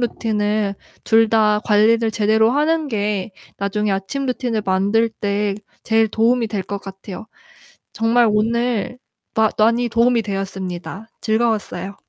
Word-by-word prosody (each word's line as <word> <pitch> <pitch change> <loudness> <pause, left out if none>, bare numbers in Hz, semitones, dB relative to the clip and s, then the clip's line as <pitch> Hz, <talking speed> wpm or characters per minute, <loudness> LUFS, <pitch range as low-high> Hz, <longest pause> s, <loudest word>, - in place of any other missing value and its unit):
루틴을 210 -3 -1 0.3
둘 225 0 +4
다 210 -1 +3
관리를 225 +2 +3
제대로 220 +1 +2
하는 305 +3 +1
게 205 -3 -2 0.2
나중에 205 +1 -1
아침 195 +9 -2
루틴을 245 -4 -2
만들 200 +4 +2
때 205 -1 -2 0.3
제일 225 0 +2
도움이 230 +2 +2
될 205 -3 -3
것 200 +1 -5
같아요. 195 +2 -9 0.7
정말 230 +1 +3
오늘 235 +2 0 0.4
마 220 -1 +3
많이 235 +3 +3
도움이 235 +1 +3
되었습니다. 195 0 -5
즐거웠어요. 215 -4 -1
220 Hz, 275 characters per minute, -20 LUFS, 200-230 Hz, 0.7 s, 둘